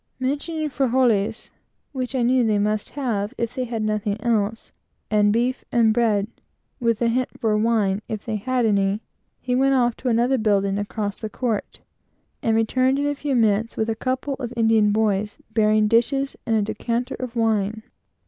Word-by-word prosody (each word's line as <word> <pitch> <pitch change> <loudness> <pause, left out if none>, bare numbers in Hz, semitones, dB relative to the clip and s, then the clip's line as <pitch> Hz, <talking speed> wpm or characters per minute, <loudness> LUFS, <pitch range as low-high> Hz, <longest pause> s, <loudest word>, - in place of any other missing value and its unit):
Mentioning 295 +4 -2
frijoles, 240 -5 +1 0.4
which 260 -1 -4
I 250 - +1
knew 250 +1 +3
they 215 -2 +2
must 210 +1 0
have 230 -4 -2
if 235 0 -2
they 255 -1 -2
had 230 -2 -3
nothing 215 -1 -1
else, 220 -1 -1 0.4
and 210 -1 +4
beef 245 +4 0
and 230 -2 +4
bread, 215 -4 +2 0.5
and 230 -2 0
a - - +3
hint 250 +2 -1
for 220 -2 +1
wine, 210 -3 +1
if 215 -2 -5
they 220 -2 -2
had 250 +3 0
any, 200 0 +1 0.4
he 250 - -2
went 270 +2 +3
off 245 -2 +2
to 255 - -2
another 245 +3 +2
building, 200 -2 +1
across 205 0 -4
the 220 - -4
court, 225 -1 -3 0.6
and 225 -1 +1
returned 255 +4 +2
in 285 - 0
a 290 - +1
few 285 -1 -2
moments, 225 -1 +1
with 220 +1 0
a - - -2
couple 260 +4 -2
of 245 -3 -4
Indian 225 -2 +4
boys, 210 -1 0 0.2
bearing 215 -1 +3
dishes 270 +5 +1
and 225 - +2
a 215 - +2
decanter 235 +3 -2
of 250 -2 -5
wine. 220 -1 0
225 Hz, 175 wpm, -23 LUFS, 215-250 Hz, 0.6 s, and